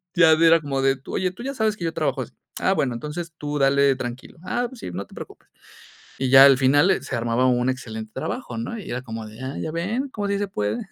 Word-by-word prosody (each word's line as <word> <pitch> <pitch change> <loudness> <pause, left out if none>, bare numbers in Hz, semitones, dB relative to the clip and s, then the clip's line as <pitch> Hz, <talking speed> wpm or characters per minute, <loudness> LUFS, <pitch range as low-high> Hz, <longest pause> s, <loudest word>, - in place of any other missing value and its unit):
Ya 175 -3 +6
era 165 +1 +5
como 135 -3 -2
de, 135 -1 +2
oye, 185 -1 -1
tú 215 - -10
ya 275 +2 -4
sabes 220 -4 +1
que 175 - -6
yo 165 - -2
trabajo 140 -5 -1
así. 125 - -6 0.3
Ah, 190 - +2
bueno, 135 -9 0
entonces 150 +8 -6
tú 145 0 -3
dale 140 0 +4
tranquilo. 125 +6 -7
Ah, 245 +6 -1
pues 255 -2 -13
sí, - - -6
no 95 +3 -5
te - - -17
preocupes. - - -11 0.7
Y 130 -1 -1
ya 135 0 +10
al 135 -1 +7
final, 145 +7 +4
eh, 190 - +1
se - - -5
armaba 115 +2 0
un 125 0 +2
excelente 110 -4 -4
trabajo, 250 - -4
¿no? 230 0 -4
Y 205 - -9
era 125 +1 -3
como 110 -3 -7
de: 110 +1 -12
"Ah, 130 +2 -5
ya 160 - -3
ven, 205 - -2
¿cómo 205 -6 -4
sí 200 0 0
se 205 0 -2
puede?" 105 - -2
140 Hz, 255 wpm, -23 LUFS, 125-185 Hz, 0.7 s, ya